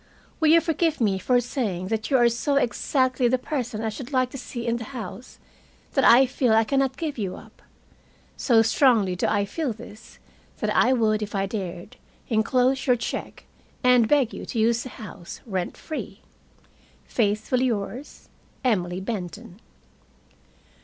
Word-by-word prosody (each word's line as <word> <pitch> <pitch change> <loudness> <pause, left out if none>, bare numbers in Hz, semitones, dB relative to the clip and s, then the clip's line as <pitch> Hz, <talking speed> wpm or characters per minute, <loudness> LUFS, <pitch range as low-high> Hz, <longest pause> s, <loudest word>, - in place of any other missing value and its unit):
"Will 320 - +3
you 330 +1 +7
forgive 325 -1 0
me 200 -5 +1
for 245 +6 +2
saying 210 -7 -3
that 220 -1 -2
you 270 - +4
are 240 -1 +5
so 235 +5 0
exactly 255 -1 +1
the 255 +2 +2
person 245 -5 -4
I 220 - 0
should 245 +5 -8
like 255 -2 +1
to - - -7
see 240 -1 -6
in 235 0 0
the 235 - -6
house 230 +3 -8 0.5
that 270 - +1
I 250 +3 +7
feel 255 -2 +1
I 225 0 +5
can 270 +5 0
not 265 -1 0
give 300 -5 -4
you 195 -3 -3
up? - - -15 0.7
So 230 -4 +4
strongly 225 -5 +3
do 180 - 0
I 205 -1 +1
feel 265 +4 -3
this 215 0 -13 0.4
that - - -1
I 255 - +4
would, 220 -4 +2
if 210 -1 -5
I 195 0 +1
dared, 190 -4 -6 0.3
enclose 250 +4 +1
your 250 - +5
check 235 - -5 0.4
and 250 -3 +5
beg 275 -4 +2
you - - -7
to - - -5
use 230 +1 +2
the 255 - -7
house 200 -6 -10
rent 190 -6 -3
free. 315 - -7 0.8
Faithfully 220 +3 0
yours, 240 +4 -4 0.4
Emily 185 -7 0
Benton." 200 0 -6
235 Hz, 165 wpm, -24 LUFS, 210-260 Hz, 0.8 s, you